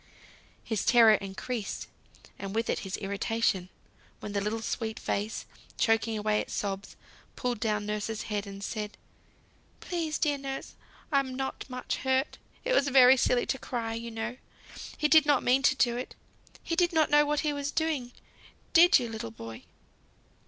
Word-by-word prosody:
His 220 -3 -2
terror 230 -3 +7
increased, 205 +3 -3 0.5
and 195 +1 -5
with 230 +1 +1
it - - -1
his 190 -1 -4
irritation; 200 -1 -1 0.5
when 210 - -6
the 200 -1 -1
little 220 +2 -2
sweet 220 -1 -3
face, 210 +2 -2 0.3
choking 225 0 +2
away 210 0 +1
its - - -4
sobs, 195 -1 -4 0.4
pulled 245 -3 -2
down 210 -2 0
nurse's 210 +1 -3
head 205 -1 -3
and 200 0 -8
said, 210 -1 -4 0.8
"Please, 330 -3 -2
dear 290 -2 +1
nurse, 270 0 -6 0.4
I'm 275 -3 +1
not 265 0 -4
much 250 0 -3
hurt; 265 +2 0 0.3
it - - +1
was 285 - +3
very 260 -1 +7
silly 250 -1 +2
to 265 - -2
cry, 230 -2 -3
you 230 +1 -5
know. 225 +2 -4 0.6
He 300 - +2
did 310 -1 +6
not 290 -3 +4
mean 255 +2 +4
to 270 - +4
do 240 -2 +2
it. 250 - -6 0.5
He 335 - -2
did 350 0 +2
not 315 -2 +3
know 295 0 +6
what 295 0 0
he 300 -2 0
was 285 0 -3
doing, 300 -6 -1 0.6
did 350 +3 +8
you, 245 -3 -2
little 220 - -5
boy? 115 0 -10
235 Hz, 165 wpm, -29 LUFS, 210-275 Hz, 0.8 s, did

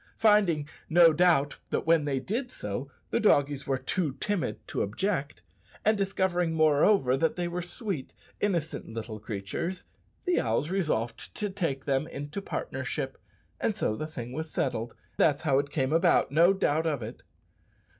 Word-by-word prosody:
Finding, 200 -9 +4 0.2
no 165 0 +7
doubt, 155 -4 +3
that - - -1
when 160 -2 +4
they 135 -2 0
did 235 - -3
so 105 - -5 0.2
the - - +2
doggies 145 -8 +3
were 135 -1 +1
too 140 +3 -1
timid 200 - -2
to - - -2
object, 145 - -2 0.4
and 215 +1 +5
discovering, 190 -4 0
moreover, 155 -2 +4
that 160 +4 +1
they 175 -1 -1
were 175 +1 -3
sweet, 175 - -4 0.3
innocent 170 -6 -1
little 110 -1 -6
creatures, 110 - -4 0.4
the 360 -1 +2
owls 115 +9 0
resolved 155 -12 -2
to 205 -2 -2
take 165 -9 -2
them 140 +2 +1
into 145 +6 -5
partnership, - - -4 0.4
and 215 - 0
so 110 - 0
the 155 - -4
thing 125 -6 -7
was 160 +3 -4
settled 120 -6 -2 0.2
that's 150 0 +3
how 140 -4 +3
it 140 0 -2
came 135 -1 0
about, 165 -4 +4
no 165 +5 +6
doubt 160 -4 +1
of 145 -7 -1
it! 115 +3 -8
155 Hz, 160 wpm, -28 LUFS, 135-180 Hz, 0.4 s, no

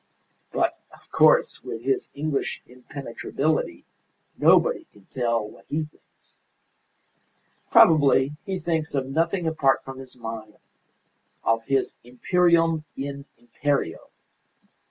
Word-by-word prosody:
But, - - 0
of - - -20
course, - - +4
with - - -6
his 395 -1 0
English 145 -1 -2
impenetrability, 135 +4 -3 0.5
nobody - - +4
can 100 -2 -21
tell 115 -3 -1
what 100 -2 -16
he 155 +1 -1
thinks. 150 - -18 1.3
Probably 140 -3 +6
he 190 -1 -3
thinks 160 -3 -2
of 135 -1 0
nothing 165 +6 0
apart 145 -4 +2
from 135 0 -9
his 130 -1 -11
mine; 115 -2 -7 0.9
of 115 0 +1
his 135 0 0
'Imperium 165 +5 +2
in 140 0 -5
Imperio. 120 - -2
140 Hz, 110 wpm, -25 LUFS, 125-160 Hz, 1.3 s, Probably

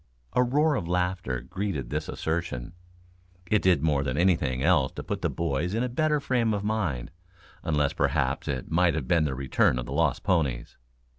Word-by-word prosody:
A - - +4
roar 145 +5 +3
of 105 -11 -2
laughter 90 -7 -1
greeted 80 -4 -4
this 75 +1 -3
assertion. 80 -3 -3 0.8
It 105 - +4
did 90 -6 +3
more 75 -3 +2
than 65 0 -2
anything 80 -8 +2
else 80 -5 +3
to - - -6
put - - -4
the - - +1
boys 85 +4 -1
in 115 - +1
a 125 - -1
better 150 +4 +1
frame 120 -6 +1
of 100 - -3
mind 95 - -2 0.5
unless 75 -3 0
perhaps - - 0
it 65 0 -3
might 85 -1 +3
have 70 -6 -3
been 85 0 +3
the 70 -3 -2
return 65 -1 +2
of 65 - -3
the - - -6
lost - - +1
ponies. 70 -9 0
85 Hz, 190 wpm, -27 LUFS, 70-100 Hz, 0.8 s, A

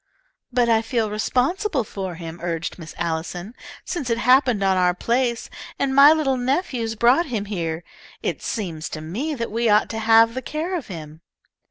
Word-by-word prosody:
"But 245 -1 +2
I 225 -1 +4
feel 225 -2 -1
responsible 260 - 0
for 190 -4 -6
him," 165 0 -8
urged 170 0 -3
Miss 160 -1 -10
Allison. 170 +5 -3 0.3
"Since 290 -9 -3
it 230 - +1
happened 250 -3 +4
on 190 -1 +3
our 180 -1 +2
place, 235 +3 0 0.3
and 275 -1 0
my 280 +2 +8
little 295 -5 +2
nephews 245 -3 -1
brought 245 +9 +4
him 220 -6 -3
here, 170 -5 -3 0.4
it - - -2
seems 170 -9 -4
to 155 - -6
me 240 - -3
that 230 -4 -4
we 230 +1 +1
ought 210 0 +4
to 225 - -3
have 225 +1 +5
the 260 - -4
care 320 +7 -3
of 330 - -4
him." 160 -3 -9
225 Hz, 180 wpm, -22 LUFS, 180-260 Hz, 0.4 s, my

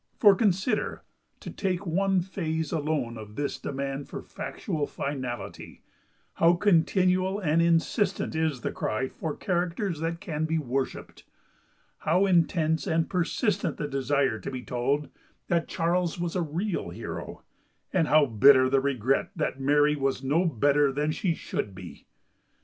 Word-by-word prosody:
For, 205 -3 +7
consider—to 195 +2 -2
take 190 -1 -2
one 190 +2 +2
phase 160 -4 -3
alone 145 -7 -1
of 105 -1 -10
this 145 0 -3
demand 135 0 -4
for - - -6
factual 150 -2 -4
finality—how 140 +5 -3
continual 185 +1 +2
and 165 -4 +2
insistent 170 +4 +1
is 160 -5 -1
the - - -2
cry 130 +5 -2
for 155 -3 -5
characters 175 -1 -1
that 165 +1 -2
can 155 -2 -3
be 160 +1 0
worshipped; 135 -2 -4 0.7
how 180 +5 +2
intense 165 -3 +2
and 160 0 +1
persistent 195 +4 0
the 150 - -3
desire 135 -3 0
to - - -6
be 130 -2 -6
told 135 +5 -1 0.4
that 170 -2 +1
Charles 175 0 0
was 170 0 -2
a 180 - +1
real 170 +5 -2
hero; - - -7 0.5
and 170 -4 +2
how 155 -1 +5
bitter 130 +2 +6
the 135 -1 +4
regret 135 -1 0
that 150 -5 -2
Mary 145 +2 +3
was 135 -2 -1
no 155 +7 +2
better 145 -1 +3
than 150 +3 0
she 170 +1 -1
should 100 -9 -4
be! 90 -2 -11
160 Hz, 140 wpm, -27 LUFS, 140-175 Hz, 0.7 s, For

